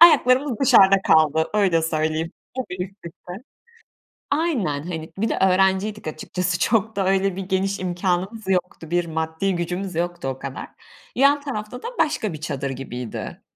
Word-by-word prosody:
Ayaklarımız 265 Hz, -6 st, +6 dB
dışarıda 195 Hz, -8 st, +6 dB
kaldı 160 Hz, -1 st, +3 dB
öyle 190 Hz, -6 st, +3 dB
söyleyeyim. 160 Hz, 0 st, -1 dB, 0.3 s
Tabii, 180 Hz, -8 st, -3 dB
üst 195 Hz, +1 st, -13 dB
üste. 170 Hz, +1 st, -10 dB, 1.0 s
Aynen, 240 Hz, -, 0 dB
hani 160 Hz, -2 st, -6 dB
bir 220 Hz, +3 st, 0 dB
de -, -, -1 dB
öğrenciydik 190 Hz, +2 st, +2 dB
açıkçası 180 Hz, +3 st, -2 dB
çok 220 Hz, -1 st, +1 dB
da 195 Hz, -1 st, 0 dB
öyle 195 Hz, 0 st, +2 dB
bir 195 Hz, -, -4 dB
geniş 190 Hz, +1 st, -1 dB
imkânımız 185 Hz, +3 st, -2 dB
yoktu. 180 Hz, -3 st, -1 dB
Bir 175 Hz, 0 st, +2 dB
maddi 160 Hz, +4 st, -1 dB
gücümüz 180 Hz, +2 st, -3 dB
yoktu 175 Hz, -3 st, -2 dB
o 135 Hz, 0 st, -3 dB
kadar. 135 Hz, 0 st, -6 dB, 0.5 s
Yan 280 Hz, +3 st, +4 dB
tarafta 250 Hz, -3 st, -5 dB
da -, -, -3 dB
başka 300 Hz, -, +1 dB
bir 155 Hz, -, -8 dB
çadır 140 Hz, -2 st, -3 dB
gibiydi. 125 Hz, -3 st, -6 dB
185 Hz, 150 wpm, -23 LUFS, 160-210 Hz, 1.0 s, Ayaklarımız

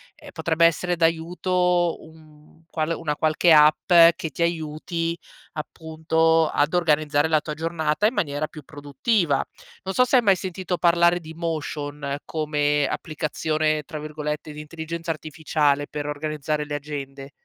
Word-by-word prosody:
ehm, -, -, -13 dB
potrebbe 165 Hz, 0 st, +1 dB
essere 175 Hz, +2 st, +1 dB
d'aiuto 175 Hz, +1 st, +1 dB
un 155 Hz, 0 st, -18 dB
qual 155 Hz, 0 st, -2 dB
una 150 Hz, -3 st, -3 dB
qualche 155 Hz, +3 st, +2 dB
app 150 Hz, +2 st, +5 dB, 0.2 s
che 160 Hz, -, -5 dB
ti 155 Hz, -, -7 dB
aiuti, 165 Hz, +1 st, -2 dB, 0.4 s
appunto, 160 Hz, +1 st, 0 dB
ad 145 Hz, +3 st, +1 dB
organizzare 155 Hz, -3 st, +2 dB
la 155 Hz, -1 st, +3 dB
tua 155 Hz, -, -5 dB
giornata 160 Hz, +3 st, 0 dB
in 230 Hz, -, -1 dB
maniera 145 Hz, -1 st, -1 dB
più 155 Hz, -1 st, -12 dB
produttiva. 145 Hz, -, 0 dB, 0.5 s
Non 190 Hz, -, -4 dB
so 250 Hz, -, +4 dB
se 250 Hz, -, +1 dB
hai -, -, +5 dB
mai 195 Hz, -3 st, +5 dB
sentito 185 Hz, 0 st, -4 dB
parlare 170 Hz, 0 st, +3 dB
di 160 Hz, -1 st, -11 dB
Motion 150 Hz, -3 st, -4 dB
come 150 Hz, -2 st, 0 dB
"applicazione", 155 Hz, 0 st, -1 dB
tra 155 Hz, +1 st, -7 dB
virgolette, 150 Hz, 0 st, -5 dB
di 150 Hz, -, -8 dB
intelligenza 165 Hz, +2 st, -5 dB
artificiale, 150 Hz, -2 st, -1 dB
per 150 Hz, -1 st, -5 dB
organizzare 150 Hz, 0 st, -3 dB
le 145 Hz, 0 st, -4 dB
agende. 140 Hz, -2 st, -7 dB
155 Hz, 145 wpm, -23 LUFS, 150-170 Hz, 0.5 s, app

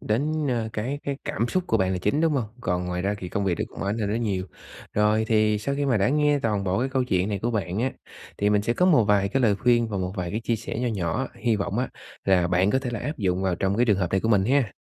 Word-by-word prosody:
đến, 135 Hz, +9 st, 0 dB, 0.2 s
ơ, 115 Hz, -3 st, -1 dB
cái 130 Hz, +7 st, -3 dB
cái 140 Hz, -1 st, -2 dB
cảm 115 Hz, +2 st, -1 dB
xúc 185 Hz, +4 st, 0 dB
của -, -, +2 dB
bạn 95 Hz, -2 st, +1 dB
là 90 Hz, -, -1 dB
chính, 105 Hz, +11 st, 0 dB
đúng 165 Hz, -1 st, +3 dB
hông? 135 Hz, -5 st, 0 dB, 0.2 s
Còn 90 Hz, -3 st, -1 dB
ngoài 90 Hz, 0 st, -2 dB
ra 100 Hz, +1 st, 0 dB
thì 90 Hz, -, -6 dB
công 100 Hz, -, -2 dB
việc 90 Hz, -4 st, 0 dB
cũng -, -, -8 dB
ảnh 100 Hz, +4 st, -1 dB
hưởng 105 Hz, -2 st, -1 dB
đến 115 Hz, +3 st, -1 dB
nhiều. 95 Hz, -4 st, -1 dB, 0.5 s
Rồi 105 Hz, +1 st, +3 dB
thì 110 Hz, -1 st, +3 dB
sau 140 Hz, +7 st, -2 dB
khi 145 Hz, 0 st, -1 dB
mà 125 Hz, -4 st, +2 dB
đã 100 Hz, +3 st, +2 dB
nghe 150 Hz, 0 st, +3 dB
toàn 105 Hz, -6 st, -1 dB
bộ 95 Hz, +2 st, 0 dB
cái 130 Hz, -, 0 dB
câu 130 Hz, -1 st, 0 dB
chuyện 95 Hz, -3 st, 0 dB
này 100 Hz, -, -1 dB
của 115 Hz, +5 st, -1 dB
bạn 100 Hz, -3 st, -2 dB
á, 130 Hz, +1 st, 0 dB, 0.5 s
thì 105 Hz, +1 st, +2 dB
mình 105 Hz, -1 st, +3 dB
sẽ 120 Hz, -, +1 dB
có 180 Hz, +8 st, +2 dB
một 150 Hz, -, +5 dB
vài 100 Hz, -1 st, +2 dB
cái 135 Hz, +5 st, 0 dB
lời 105 Hz, -4 st, +4 dB
khuyên 120 Hz, 0 st, +2 dB
và 100 Hz, -3 st, -3 dB
một 90 Hz, 0 st, -2 dB
vài 90 Hz, -1 st, -3 dB
cái 110 Hz, -, -2 dB
chia 115 Hz, 0 st, -1 dB
sẻ 110 Hz, +1 st, -5 dB
nho 125 Hz, -, 0 dB
nhỏ, 105 Hz, +4 st, -2 dB
hi 115 Hz, -3 st, 0 dB
vọng 100 Hz, +2 st, -2 dB
á 130 Hz, -, 0 dB, 0.4 s
là 90 Hz, -2 st, +3 dB
bạn 90 Hz, +2 st, +2 dB
có 130 Hz, -, +2 dB
thể 130 Hz, -2 st, -4 dB
là 120 Hz, -, -4 dB
áp 150 Hz, +5 st, -4 dB
dụng 95 Hz, -2 st, 0 dB
vào 95 Hz, -2 st, +1 dB
trong 95 Hz, +2 st, 0 dB
cái 120 Hz, -, +4 dB
trường 100 Hz, -3 st, +3 dB
hợp 90 Hz, -3 st, -1 dB
này 95 Hz, -, +2 dB
của 115 Hz, -, -1 dB
mình 100 Hz, -4 st, +4 dB
ha! 130 Hz, -2 st, +2 dB
105 Hz, 305 wpm, -25 LUFS, 95-125 Hz, 0.5 s, một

